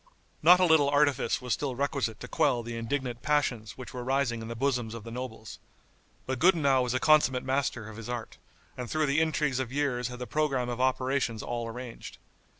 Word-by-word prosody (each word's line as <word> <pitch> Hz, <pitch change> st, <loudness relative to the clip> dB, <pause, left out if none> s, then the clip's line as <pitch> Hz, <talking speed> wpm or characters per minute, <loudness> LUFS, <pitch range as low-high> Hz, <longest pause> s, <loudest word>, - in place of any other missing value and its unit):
Not 175 Hz, +3 st, +7 dB
a 185 Hz, -, +5 dB
little 160 Hz, -4 st, +5 dB
artifice 145 Hz, -3 st, +2 dB
was 125 Hz, -, 0 dB
still 135 Hz, -4 st, -2 dB
requisite 140 Hz, -5 st, -1 dB
to 125 Hz, -, -6 dB
quell 120 Hz, -1 st, +1 dB
the 115 Hz, 0 st, -6 dB
indignant 120 Hz, +1 st, -3 dB
passions 125 Hz, -8 st, 0 dB
which 130 Hz, +3 st, -9 dB
were 125 Hz, -1 st, -5 dB
rising 130 Hz, -3 st, 0 dB
in 110 Hz, -, -7 dB
the 115 Hz, -, -5 dB
bosoms 120 Hz, -3 st, -1 dB
of 115 Hz, -, -8 dB
the 115 Hz, -, -8 dB
nobles. 115 Hz, -3 st, -7 dB, 0.7 s
But 130 Hz, -1 st, -3 dB
Gudenow 150 Hz, -7 st, +4 dB
was 125 Hz, 0 st, -1 dB
a -, -, +2 dB
consummate 145 Hz, -4 st, +4 dB
master 130 Hz, -4 st, -1 dB
of 110 Hz, -1 st, -10 dB
his 115 Hz, 0 st, -8 dB
art, 120 Hz, -2 st, -5 dB, 0.4 s
and 125 Hz, -2 st, -6 dB
through 155 Hz, 0 st, +1 dB
the 145 Hz, +2 st, +2 dB
intrigues 150 Hz, -4 st, 0 dB
of 130 Hz, -2 st, -3 dB
years 130 Hz, -4 st, 0 dB
had 125 Hz, 0 st, -7 dB
the 125 Hz, -, -5 dB
programme 135 Hz, -4 st, 0 dB
of 120 Hz, +1 st, -3 dB
operations 130 Hz, -3 st, 0 dB
all 120 Hz, -1 st, -3 dB
arranged. 120 Hz, +1 st, -8 dB
130 Hz, 205 wpm, -29 LUFS, 120-140 Hz, 0.7 s, Not